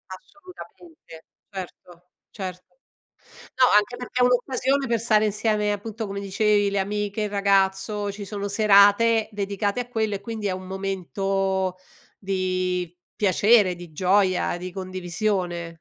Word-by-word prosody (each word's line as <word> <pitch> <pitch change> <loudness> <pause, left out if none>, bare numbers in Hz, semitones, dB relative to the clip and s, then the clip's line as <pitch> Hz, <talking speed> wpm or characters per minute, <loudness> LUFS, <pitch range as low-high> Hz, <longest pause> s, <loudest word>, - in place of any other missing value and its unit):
Assolutamente, 320 - -15 0.3
certo, 180 -2 -10 0.2
certo. 185 -3 -8 0.8
No, 255 - +5
anche 225 +4 +1
perché 245 0 -4
è - - +6
un'occasione 260 +2 +1
per 230 -1 +1
stare 215 -1 +3
insieme, 210 0 0
appunto 220 +2 -5
come 200 0 -5
dicevi, 205 +1 +1
le 200 0 -1
amiche, 205 +1 -2
il 210 - -1
ragazzo, 200 +1 +1
ci 200 0 -8
sono 200 0 -4
serate 215 +2 +4
dedicate 200 +2 -2
a 245 - -4
quello, 220 -4 -1
e 195 - -6
quindi 220 -1 -4
è - - -1
un 185 0 -6
momento 190 0 -2 0.4
di 185 -2 -2 0.2
piacere, 200 -1 +4
di 175 -2 -11
gioia, 185 0 +2
di 180 +1 -7
condivisione. 185 -1 -3
200 Hz, 135 wpm, -24 LUFS, 185-215 Hz, 0.8 s, è